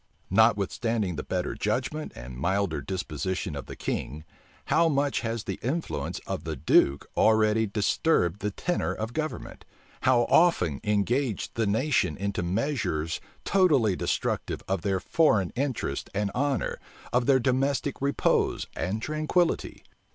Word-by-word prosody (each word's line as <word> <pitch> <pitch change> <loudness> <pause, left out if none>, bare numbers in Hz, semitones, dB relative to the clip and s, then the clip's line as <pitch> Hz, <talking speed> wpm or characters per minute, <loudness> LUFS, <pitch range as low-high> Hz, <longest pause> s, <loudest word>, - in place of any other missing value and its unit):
Notwithstanding 110 -1 +2
the - - -3
better 90 -1 -2
judgment 130 +8 -2
and 60 +1 -8
milder 90 +2 0
disposition 90 +1 -3
of 70 - -6
the - - -7
king, 75 +4 -4 0.4
how 165 +1 +3
much 140 -1 +1
has 115 -2 -3
the - - -5
influence 155 +8 -2
of - - -4
the - - -3
duke 70 +1 +3
already 110 0 +3
disturbed 100 - +1
the 105 - -1
tenor 175 - -2
of 110 +2 -4
government! 155 +2 -4 0.4
how 125 -2 +4
often 120 - +3
engaged 110 +3 0
the 115 -2 0
nation 105 - +1
into 100 0 -2
measures 90 - -1 0.2
totally 145 - +3
destructive - - -2
of 95 -2 -1
their 95 +1 0
foreign 110 - +2
interests 135 -1 -2
and 100 0 0
honor, 140 +2 -1 0.3
of 120 -1 +2
their 135 -2 +5
domestic 135 +3 0
repose 140 +1 +1
and 105 +4 -2
tranquillity! 155 +3 0
110 Hz, 135 wpm, -27 LUFS, 95-140 Hz, 0.4 s, their